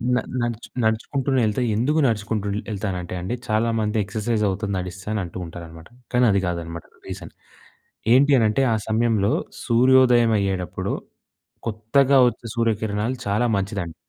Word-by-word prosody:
న -, -, +3 dB, 0.2 s
నడుచు 120 Hz, -1 st, -3 dB, 0.2 s
నడుచుకుంటూనే 130 Hz, +4 st, 0 dB
వెళ్తే 105 Hz, +4 st, 0 dB
ఎందుకు 140 Hz, +8 st, +1 dB
నడుచుకుంటూ 105 Hz, -2 st, -1 dB, 0.2 s
ఎళ్తానంటే, 95 Hz, -4 st, -4 dB
అండి 95 Hz, +7 st, -3 dB
చాలా 110 Hz, +1 st, +1 dB
మంది 105 Hz, 0 st, -1 dB
ఎక్సర్‌సైజ్ 105 Hz, +3 st, -2 dB
అవుతుంది 100 Hz, +1 st, -3 dB
నడిస్తే 90 Hz, +1 st, -7 dB
అని 105 Hz, -, -1 dB
అంటూ 85 Hz, +1 st, -8 dB
ఉంటారన్నమాట. 80 Hz, 0 st, -10 dB, 0.3 s
కానీ 125 Hz, 0 st, +4 dB
అది 100 Hz, -1 st, +2 dB
కాదన్నమాట 85 Hz, -1 st, -5 dB, 0.2 s
రీజన్. -, -, -8 dB, 0.8 s
ఏంటి 140 Hz, +3 st, +5 dB
అనంటే, 110 Hz, +3 st, +2 dB
ఆ -, -, +2 dB
సమయంలో 110 Hz, -2 st, +2 dB, 0.3 s
సూర్యోదయం 120 Hz, -1 st, +5 dB
అయ్యేటప్పుడు 95 Hz, -4 st, -2 dB, 0.7 s
కొత్తగా 130 Hz, +5 st, +3 dB
వచ్చే 120 Hz, -, -10 dB
సూర్యకిరణాలు 110 Hz, +1 st, 0 dB
చాలా 105 Hz, +4 st, +1 dB
మంచిదండి. 95 Hz, -4 st, -3 dB
110 Hz, 130 wpm, -23 LUFS, 95-120 Hz, 0.8 s, ఏంటి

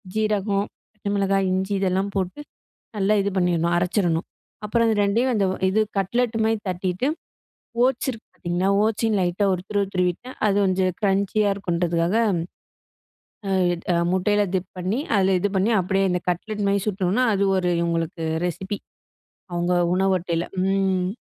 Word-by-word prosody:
ஜீரகம், 205 Hz, -2 st, +1 dB, 0.3 s
பச்ச 210 Hz, -1 st, -9 dB
மிளகாய், 195 Hz, -1 st, +1 dB
இஞ்சி 190 Hz, +2 st, -1 dB
இதெல்லாம் 190 Hz, +1 st, 0 dB
போட்டு 190 Hz, +6 st, -2 dB, 0.6 s
நல்லா 205 Hz, +1 st, +2 dB
இது 200 Hz, +1 st, -1 dB
பண்ணிரணும், 170 Hz, -1 st, +1 dB
அரச்சிறணும். 175 Hz, -2 st, +1 dB, 0.4 s
அப்புறம் 230 Hz, +2 st, +2 dB
இது 220 Hz, -, +2 dB
2யும் 230 Hz, +6 st, +2 dB
அந்த 200 Hz, -2 st, +2 dB, 0.2 s
இது 215 Hz, +3 st, +2 dB, 0.2 s
கட்லெட் 230 Hz, +4 st, 0 dB
மாரி 225 Hz, 0 st, +2 dB
தட்டிட்டு 185 Hz, +6 st, -1 dB, 0.8 s
ஓட்ஸ் 260 Hz, 0 st, 0 dB
இருக்கு 225 Hz, -1 st, -12 dB
பாத்தீங்களா, 175 Hz, +2 st, -1 dB
ஓட்ஸையும் 220 Hz, 0 st, +1 dB
லைட்டா 180 Hz, +3 st, +1 dB
ஒரு 180 Hz, -, -3 dB
துருவு, 205 Hz, -1 st, +1 dB
துருவிட்டா 180 Hz, +7 st, -1 dB, 0.2 s
அது 200 Hz, -, +2 dB
கொஞ்சம் 185 Hz, -1 st, +1 dB
க்ரஞ்சியா 200 Hz, +1 st, +2 dB
இருக்கும்ன்றதுக்காக. 175 Hz, -1 st, 0 dB, 1.8 s
ஆ, -, -, +2 dB, 0.2 s
முட்டைல 205 Hz, +3 st, +2 dB
டிப் 185 Hz, 0 st, -2 dB
பண்ணி, 185 Hz, +7 st, -1 dB, 0.2 s
அதுல 190 Hz, -1 st, +3 dB
இது 205 Hz, -, +1 dB
பண்ணி 195 Hz, +4 st, +2 dB
அப்டியே 195 Hz, +2 st, +1 dB
இந்த 180 Hz, -, +1 dB
கட்லெட் 205 Hz, +4 st, -3 dB
மாரி 200 Hz, 0 st, +2 dB
சுட்டணும்னா, 195 Hz, +4 st, +1 dB
அது 200 Hz, 0 st, +1 dB
ஒரு 180 Hz, -1 st, +1 dB
இவங்களுக்கு 165 Hz, -1 st, -2 dB, 0.2 s
ரெசிபி. 190 Hz, +4 st, -4 dB, 0.7 s
அவங்க 175 Hz, +1 st, 0 dB, 0.2 s
உணவு 190 Hz, 0 st, +2 dB
அட்டைல. 170 Hz, -1 st, -2 dB, 0.2 s
ம். 190 Hz, -1 st, +1 dB
195 Hz, 140 wpm, -23 LUFS, 180-205 Hz, 1.8 s, அதுல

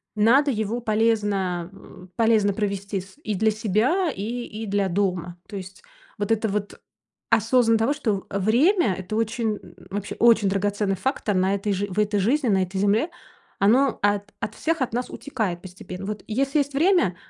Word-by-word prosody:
надо 265 Hz, +7 st, +4 dB
его 220 Hz, +1 st, -2 dB
полезно, 205 Hz, -6 st, 0 dB
э, 185 Hz, -1 st, -14 dB
полезно 220 Hz, -3 st, +3 dB
провести 200 Hz, -1 st, -2 dB
с 190 Hz, +8 st, -16 dB
и 210 Hz, -, -2 dB
для 220 Hz, +3 st, +2 dB
себя, 225 Hz, -, +1 dB
и 195 Hz, -, -6 dB, 0.2 s
и 220 Hz, +1 st, -7 dB
для 200 Hz, -1 st, 0 dB
дома. 180 Hz, -2 st, -1 dB
То 210 Hz, -, -9 dB
есть 190 Hz, 0 st, -10 dB, 0.3 s
вот 205 Hz, +2 st, -2 dB
это 225 Hz, 0 st, +2 dB
вот 205 Hz, 0 st, -3 dB, 0.5 s
осознанно 230 Hz, 0 st, +4 dB
того, 265 Hz, +6 st, +2 dB
что, 215 Hz, -10 st, -2 dB
э, 200 Hz, -, -2 dB
в 190 Hz, -, -3 dB
время- 260 Hz, -, +4 dB
это 190 Hz, +3 st, -5 dB
очень, 225 Hz, -1 st, -1 dB
н 175 Hz, -1 st, -16 dB, 0.2 s
вообще 205 Hz, 0 st, -4 dB
очень 225 Hz, -4 st, +5 dB
драгоценный 200 Hz, 0 st, 0 dB
фактор 210 Hz, -1 st, -1 dB
на 190 Hz, +2 st, +2 dB
этой 200 Hz, 0 st, -1 dB
жиз 200 Hz, +2 st, -2 dB
в 190 Hz, +3 st, -3 dB
этой 210 Hz, -1 st, +1 dB
жизни, 255 Hz, +7 st, +1 dB
на 190 Hz, -2 st, +3 dB
этой 190 Hz, +1 st, -4 dB
земле, 210 Hz, -, +2 dB, 0.5 s
оно 240 Hz, +6 st, +3 dB
от 205 Hz, 0 st, 0 dB
от 215 Hz, -, -4 dB
всех 325 Hz, -3 st, -1 dB
от 245 Hz, -, -1 dB
нас 245 Hz, +1 st, -2 dB
утекает 220 Hz, -11 st, -3 dB
постепенно. 185 Hz, +1 st, -9 dB
Вот 210 Hz, 0 st, -5 dB
если 275 Hz, +6 st, +1 dB
есть 285 Hz, 0 st, -1 dB
время, 325 Hz, -, +3 dB
210 Hz, 185 wpm, -24 LUFS, 195-230 Hz, 0.5 s, очень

